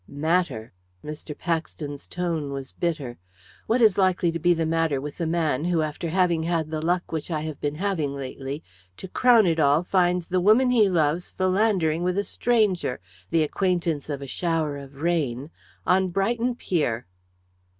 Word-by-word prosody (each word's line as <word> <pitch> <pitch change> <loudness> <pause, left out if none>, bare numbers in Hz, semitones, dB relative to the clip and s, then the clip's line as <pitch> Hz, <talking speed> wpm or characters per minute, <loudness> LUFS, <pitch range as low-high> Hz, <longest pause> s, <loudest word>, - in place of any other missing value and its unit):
"Matter!" 145 - -1 0.3
Mr. 150 0 -7
Paxton's 160 -4 -4
tone 165 -5 -2
was 135 -1 -6
bitter. 155 -8 -3 0.5
"What 235 +2 +3
is 210 -3 +5
likely 185 -2 +2
to 170 - -4
be 175 +2 +3
the 165 0 0
matter 160 -3 +1
with 145 +4 -7
the 165 - -1
man 160 -3 0
who, 170 -3 +1
after 155 +2 -4
having 175 -1 +2
had 160 -2 -1
the 155 -1 -2
luck 175 +2 0
which 160 0 -3
I 155 -3 -1
have 155 -2 -6
been 145 0 -1
having 160 -6 -1
lately, 135 +2 -6 0.3
to - - -7
crown 235 +2 +5
it 165 -2 +1
all 145 +2 +4
finds 180 -1 +1
the 185 0 +1
woman 230 +7 +5
he 220 -5 +4
loves 165 -1 +1
philandering 185 -4 +1
with 180 +1 0
a 200 - +2
stranger 210 - +1 0.3
the 165 -1 +3
acquaintance 170 -3 -1
of 140 -1 -4
a - - -5
shower 160 -1 -1
of 140 -1 -10
rain 150 -5 -1 0.3
on 190 +1 +3
Brighton 230 +6 0
pier." 145 - -1
165 Hz, 170 wpm, -25 LUFS, 150-185 Hz, 0.5 s, is